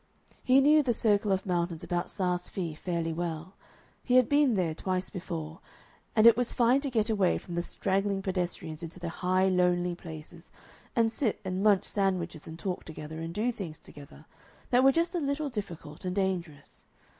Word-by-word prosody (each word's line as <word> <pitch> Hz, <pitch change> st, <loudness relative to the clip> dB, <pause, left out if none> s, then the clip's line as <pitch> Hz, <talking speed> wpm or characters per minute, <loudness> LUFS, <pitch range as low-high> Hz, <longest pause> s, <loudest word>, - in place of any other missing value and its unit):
He 260 Hz, +2 st, +5 dB
knew 300 Hz, +2 st, +6 dB
the 250 Hz, -5 st, 0 dB
circle 205 Hz, -2 st, +2 dB
of 190 Hz, 0 st, 0 dB
mountains 175 Hz, -3 st, -1 dB
about 175 Hz, 0 st, -2 dB
Saas 180 Hz, -2 st, -1 dB
Fee 170 Hz, -5 st, -3 dB
fairly 165 Hz, 0 st, -2 dB
well: 170 Hz, +1 st, -4 dB, 0.5 s
he 250 Hz, -, +1 dB
had 255 Hz, -2 st, +6 dB
been 285 Hz, -5 st, +3 dB
there 175 Hz, -5 st, 0 dB
twice 185 Hz, +3 st, -2 dB
before, 165 Hz, -3 st, -6 dB, 0.6 s
and 215 Hz, 0 st, +5 dB
it 230 Hz, -1 st, +9 dB
was 245 Hz, -1 st, -1 dB
fine 245 Hz, +3 st, +4 dB
to 280 Hz, -, -2 dB
get 220 Hz, -4 st, +1 dB
away 200 Hz, -5 st, +2 dB
from 175 Hz, -, -9 dB
the 170 Hz, -, 0 dB
straggling 195 Hz, +2 st, -1 dB
pedestrians 175 Hz, -4 st, -3 dB
into 170 Hz, +2 st, -8 dB
the 170 Hz, -1 st, -4 dB
high, 185 Hz, +2 st, +1 dB
lonely 180 Hz, -1 st, +2 dB
places, 165 Hz, 0 st, -10 dB, 0.5 s
and 230 Hz, -2 st, +3 dB
sit 225 Hz, -2 st, -1 dB
and 185 Hz, 0 st, -2 dB
munch 205 Hz, -2 st, +4 dB
sandwiches 185 Hz, -6 st, -1 dB
and 160 Hz, 0 st, -8 dB
talk 180 Hz, +1 st, -3 dB
together 155 Hz, 0 st, -8 dB
and 165 Hz, +1 st, -5 dB
do 230 Hz, +4 st, +1 dB
things 185 Hz, -9 st, -7 dB
together 145 Hz, +1 st, -14 dB, 0.5 s
that 250 Hz, +1 st, +5 dB
were 270 Hz, -, +7 dB
just 335 Hz, +4 st, 0 dB
a 350 Hz, -, 0 dB
little 285 Hz, 0 st, -1 dB
difficult 175 Hz, -, -7 dB
and 180 Hz, 0 st, -3 dB
dangerous. 175 Hz, -7 st, -3 dB
185 Hz, 185 wpm, -29 LUFS, 170-220 Hz, 0.6 s, it